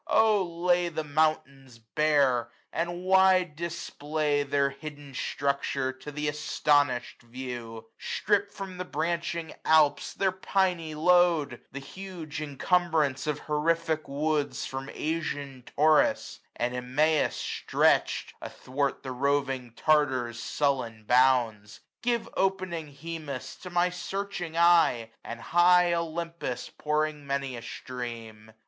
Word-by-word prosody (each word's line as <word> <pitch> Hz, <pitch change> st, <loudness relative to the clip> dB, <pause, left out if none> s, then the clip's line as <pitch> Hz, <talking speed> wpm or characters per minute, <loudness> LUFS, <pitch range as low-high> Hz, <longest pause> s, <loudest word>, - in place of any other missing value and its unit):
O 220 Hz, -2 st, +4 dB
lay 175 Hz, 0 st, +1 dB
the 160 Hz, -1 st, -3 dB
mountains 145 Hz, -4 st, -1 dB
bare; 130 Hz, 0 st, +2 dB, 0.2 s
and 175 Hz, +2 st, -2 dB
wide 185 Hz, -3 st, +4 dB
display 155 Hz, -3 st, -2 dB
Their 140 Hz, 0 st, +1 dB
hidden 145 Hz, 0 st, -9 dB
structure 140 Hz, -1 st, -1 dB
to 130 Hz, +3 st, -9 dB
th' 150 Hz, +1 st, -3 dB
astonish'd 145 Hz, -3 st, +1 dB
view; 120 Hz, -2 st, -7 dB
Strip 205 Hz, 0 st, 0 dB
from 190 Hz, -2 st, -7 dB
the -, -, -1 dB
branching 170 Hz, 0 st, -2 dB
Alps 155 Hz, -2 st, +3 dB
their 195 Hz, -1 st, +2 dB
piny 185 Hz, -4 st, 0 dB
load; 165 Hz, -5 st, +3 dB
The 140 Hz, -, -8 dB
huge 160 Hz, +1 st, -7 dB
incumbrance 155 Hz, -1 st, +1 dB
of 150 Hz, -1 st, -1 dB
horrific 160 Hz, +1 st, 0 dB
woods 145 Hz, -2 st, -1 dB
780 -, -, -3 dB
From 135 Hz, +1 st, -6 dB
Asian 145 Hz, -4 st, -3 dB
Taurus, 155 Hz, +1 st, +3 dB, 0.2 s
from 120 Hz, +1 st, 0 dB
Imaus 140 Hz, +5 st, +1 dB
stretch'd -, -, +1 dB
Athwart 140 Hz, +2 st, -3 dB
the 130 Hz, -, -5 dB
roving 135 Hz, -1 st, 0 dB
Tartar's 130 Hz, -6 st, +1 dB
sullen 120 Hz, -3 st, -1 dB
bounds; 120 Hz, -4 st, +2 dB, 0.2 s
Give 235 Hz, -1 st, 0 dB
opening 185 Hz, -4 st, -1 dB
Hemus 150 Hz, -2 st, -6 dB
to 180 Hz, -, -7 dB
my 175 Hz, 0 st, +2 dB
searching 180 Hz, -2 st, -4 dB
eye, 165 Hz, -10 st, +4 dB
And 115 Hz, -, -7 dB
high 175 Hz, +3 st, +4 dB
Olympus 170 Hz, -4 st, -3 dB
pouring 150 Hz, -1 st, -1 dB
many 140 Hz, -2 st, -2 dB
a 120 Hz, -, -7 dB
stream. 115 Hz, -4 st, -7 dB
150 Hz, 115 wpm, -28 LUFS, 130-170 Hz, 0.2 s, O